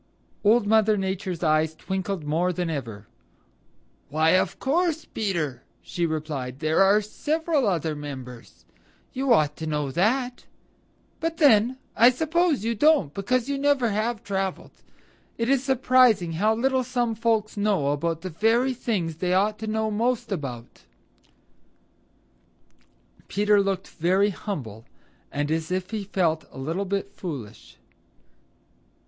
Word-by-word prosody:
Old 220 Hz, +1 st, +4 dB
Mother 215 Hz, 0 st, +3 dB
Nature's 190 Hz, -2 st, -3 dB
eyes 155 Hz, 0 st, +2 dB
twinkled 190 Hz, 0 st, -4 dB
more 165 Hz, +5 st, 0 dB
than 175 Hz, -1 st, -2 dB
ever. 115 Hz, -8 st, -6 dB, 1.0 s
"Why, 155 Hz, +3 st, +2 dB
of 185 Hz, 0 st, +2 dB
course, 325 Hz, +2 st, 0 dB
Peter," 165 Hz, -, -3 dB, 0.2 s
she 170 Hz, -1 st, -2 dB
replied. 150 Hz, -5 st, -4 dB
"There 155 Hz, +4 st, +1 dB
are 200 Hz, +2 st, +5 dB
several 305 Hz, +4 st, -1 dB
other 165 Hz, -5 st, 0 dB
members. 130 Hz, -5 st, -9 dB, 0.5 s
You 265 Hz, 0 st, -1 dB
ought 150 Hz, -9 st, +3 dB
to 160 Hz, -, -5 dB
know 150 Hz, -3 st, -2 dB
that. 245 Hz, -, 0 dB, 0.7 s
But 330 Hz, 0 st, -2 dB
then, 250 Hz, -4 st, +4 dB, 0.2 s
I 235 Hz, +2 st, +7 dB
suppose 315 Hz, -, +1 dB
you 230 Hz, -, +1 dB
don't 230 Hz, -, +3 dB
because 245 Hz, +5 st, 0 dB
you 280 Hz, -1 st, -2 dB
never 275 Hz, -5 st, +2 dB
have 215 Hz, +1 st, -2 dB
traveled. 195 Hz, -1 st, -3 dB, 0.7 s
It 230 Hz, +1 st, -1 dB
is 270 Hz, -1 st, +2 dB
surprising 255 Hz, -8 st, +3 dB
how 210 Hz, +7 st, +1 dB
little 260 Hz, +2 st, +1 dB
some 245 Hz, -2 st, -1 dB
folks 220 Hz, -1 st, 0 dB
know 200 Hz, -9 st, +1 dB
about 160 Hz, +3 st, -1 dB
the 185 Hz, 0 st, -6 dB
very 230 Hz, +9 st, +2 dB
things 185 Hz, -10 st, -2 dB
they 180 Hz, +1 st, 0 dB
ought 210 Hz, +3 st, +1 dB
to 220 Hz, -, -5 dB
know 220 Hz, 0 st, -1 dB
most 230 Hz, +2 st, -1 dB
about." 130 Hz, -10 st, -6 dB, 2.5 s
Peter 205 Hz, 0 st, +3 dB
looked 195 Hz, -1 st, -2 dB
very 190 Hz, +5 st, +1 dB
humble 125 Hz, -, -6 dB, 0.5 s
and 145 Hz, +1 st, -2 dB
as 160 Hz, 0 st, -1 dB
if 185 Hz, +1 st, -2 dB
he 215 Hz, -3 st, -3 dB
felt 165 Hz, -6 st, 0 dB
a -, -, -13 dB
little 165 Hz, +9 st, -3 dB
bit 200 Hz, +1 st, -3 dB
foolish. 135 Hz, -, -8 dB
195 Hz, 135 wpm, -25 LUFS, 160-235 Hz, 2.5 s, I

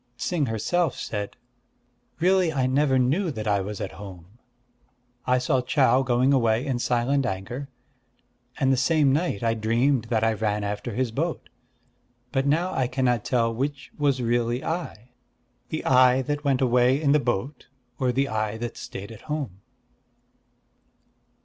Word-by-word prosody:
Ts'ing 155 Hz, 0 st, -1 dB
herself 135 Hz, +8 st, 0 dB
said: 105 Hz, -2 st, -5 dB, 0.8 s
"Really 180 Hz, 0 st, +3 dB
I 135 Hz, -4 st, 0 dB
never 135 Hz, +1 st, +2 dB
knew 145 Hz, +9 st, +1 dB
that 110 Hz, -7 st, -5 dB
I 100 Hz, -1 st, +2 dB
was 100 Hz, +1 st, -5 dB
at -, -, -4 dB
home. 95 Hz, +1 st, -12 dB, 0.9 s
I 125 Hz, 0 st, +4 dB
saw 130 Hz, 0 st, +1 dB
Chau 130 Hz, 0 st, +3 dB
going 130 Hz, +1 st, +2 dB
away 115 Hz, -1 st, +2 dB
in 130 Hz, -4 st, -1 dB
silent 125 Hz, +3 st, +1 dB
anger; 120 Hz, +9 st, -5 dB, 0.9 s
and 135 Hz, 0 st, +3 dB
the -, -, +1 dB
same 140 Hz, 0 st, +3 dB
night 150 Hz, -, -1 dB
I 115 Hz, 0 st, +2 dB
dreamed 115 Hz, +3 st, +1 dB
that 115 Hz, -1 st, 0 dB
I 115 Hz, 0 st, +3 dB
ran 105 Hz, -1 st, -1 dB
after 105 Hz, 0 st, -4 dB
his 125 Hz, -1 st, 0 dB
boat.... -, -, -3 dB, 0.8 s
But 135 Hz, 0 st, 0 dB
now 170 Hz, +6 st, +1 dB
I 130 Hz, -2 st, 0 dB
cannot 125 Hz, -3 st, 0 dB
tell 115 Hz, -2 st, +1 dB
which 135 Hz, +4 st, -4 dB
was 140 Hz, -4 st, +1 dB
really 120 Hz, +1 st, 0 dB
I, 160 Hz, -8 st, -5 dB, 0.6 s
the 155 Hz, -, -4 dB
I 130 Hz, 0 st, +5 dB
that 145 Hz, +1 st, -3 dB
went 135 Hz, -3 st, +1 dB
away 125 Hz, +1 st, +3 dB
in 145 Hz, -2 st, +2 dB
the 150 Hz, -, +5 dB
boat, 125 Hz, +2 st, -3 dB, 0.3 s
or 130 Hz, -1 st, +1 dB
the 135 Hz, +3 st, +1 dB
I 110 Hz, -2 st, -2 dB
that 120 Hz, 0 st, -5 dB
stayed 100 Hz, +3 st, -8 dB
at 110 Hz, -, -11 dB
home." 135 Hz, -11 st, -4 dB
125 Hz, 155 wpm, -25 LUFS, 115-140 Hz, 0.9 s, I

